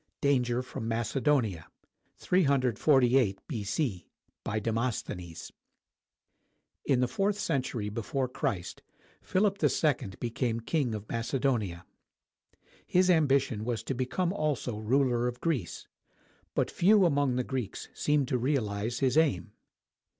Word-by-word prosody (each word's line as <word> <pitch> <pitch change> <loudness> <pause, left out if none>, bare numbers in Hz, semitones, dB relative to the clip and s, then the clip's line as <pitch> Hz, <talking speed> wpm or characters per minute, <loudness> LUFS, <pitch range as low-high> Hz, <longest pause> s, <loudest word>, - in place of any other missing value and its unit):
DANGER 125 -3 +2
FROM 125 -2 -6
MACEDONIA 115 - 0 0.5
[348 130 - +3
B.C.] 110 - -2 0.4
BY 110 +1 -1
DEMOSTHENES 110 -6 -3 1.3
[In 130 -3 +2
the 125 - +2
fourth 195 +10 0
century 125 - -2
before 120 +5 -2
Christ, 120 - -3 0.4
Philip 195 +1 +1
II 145 -10 +2
became 115 -1 -1
King 125 -1 -1
of 105 0 -7
Macedonia. 115 -6 -1 1.0
His 180 +1 +4
ambition 140 -9 +2
was 115 -1 -2
to 135 - -2
become 130 +9 -1
also 150 - -1
ruler 120 +1 +2
of 125 0 -4
Greece; 130 - -2 0.7
but - - +1
few 200 +2 +5
among 140 -5 +2
the 125 - 0
Greeks 130 -5 -4
seemed 145 -3 +1
to 125 - +1
realize 115 -4 -1
his 130 +2 +4
aim. 140 - +1
125 Hz, 115 wpm, -29 LUFS, 115-145 Hz, 1.3 s, few